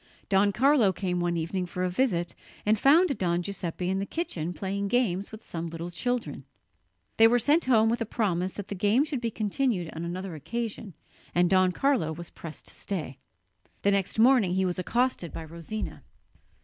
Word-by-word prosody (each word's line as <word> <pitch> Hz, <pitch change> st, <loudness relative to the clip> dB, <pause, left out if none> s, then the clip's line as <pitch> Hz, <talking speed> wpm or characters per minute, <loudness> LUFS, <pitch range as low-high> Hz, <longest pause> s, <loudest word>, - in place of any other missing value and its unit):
Don 200 Hz, +1 st, +4 dB
Carlo 250 Hz, -1 st, +4 dB
came 180 Hz, -1 st, -2 dB
one 175 Hz, -1 st, 0 dB
evening 180 Hz, +3 st, -2 dB
for 180 Hz, +1 st, -3 dB
a 185 Hz, -, +1 dB
visit, 180 Hz, -6 st, 0 dB, 0.3 s
and 215 Hz, 0 st, +3 dB
found 300 Hz, -, +5 dB
Don 175 Hz, -1 st, +1 dB
Giuseppe 180 Hz, -2 st, -4 dB
in 190 Hz, +1 st, 0 dB
the 195 Hz, -, -2 dB
kitchen 175 Hz, -, -3 dB
playing 200 Hz, +2 st, -3 dB
games 200 Hz, -4 st, 0 dB
with 220 Hz, 0 st, -10 dB
some 170 Hz, 0 st, -5 dB
little 165 Hz, +1 st, -6 dB
children. 245 Hz, +6 st, -2 dB, 0.7 s
They 225 Hz, -, +8 dB
were 240 Hz, +2 st, +4 dB
sent 290 Hz, +8 st, +3 dB
home 225 Hz, -4 st, +4 dB
with 235 Hz, +2 st, 0 dB
a -, -, +1 dB
promise 185 Hz, -5 st, -1 dB
that 205 Hz, -2 st, -7 dB
the -, -, -3 dB
game 205 Hz, +7 st, +3 dB
should 290 Hz, -5 st, -3 dB
be 235 Hz, -, 0 dB
continued 215 Hz, -4 st, -1 dB
on 165 Hz, -, -5 dB
another 180 Hz, +2 st, -4 dB
occasion, 215 Hz, -, -5 dB, 0.4 s
and 175 Hz, +1 st, +3 dB
Don 185 Hz, -1 st, +4 dB
Carlo 195 Hz, -, +1 dB
was 170 Hz, +2 st, -7 dB
pressed 160 Hz, -2 st, -9 dB
to -, -, -14 dB
stay. 150 Hz, -9 st, -5 dB, 0.6 s
The 200 Hz, -, +4 dB
next 200 Hz, 0 st, 0 dB
morning 225 Hz, -6 st, +5 dB
he 190 Hz, 0 st, +2 dB
was 180 Hz, 0 st, -1 dB
accosted 235 Hz, -3 st, 0 dB
by 165 Hz, -, -6 dB
Rosina. 170 Hz, +7 st, -6 dB
195 Hz, 190 wpm, -27 LUFS, 175-230 Hz, 0.7 s, They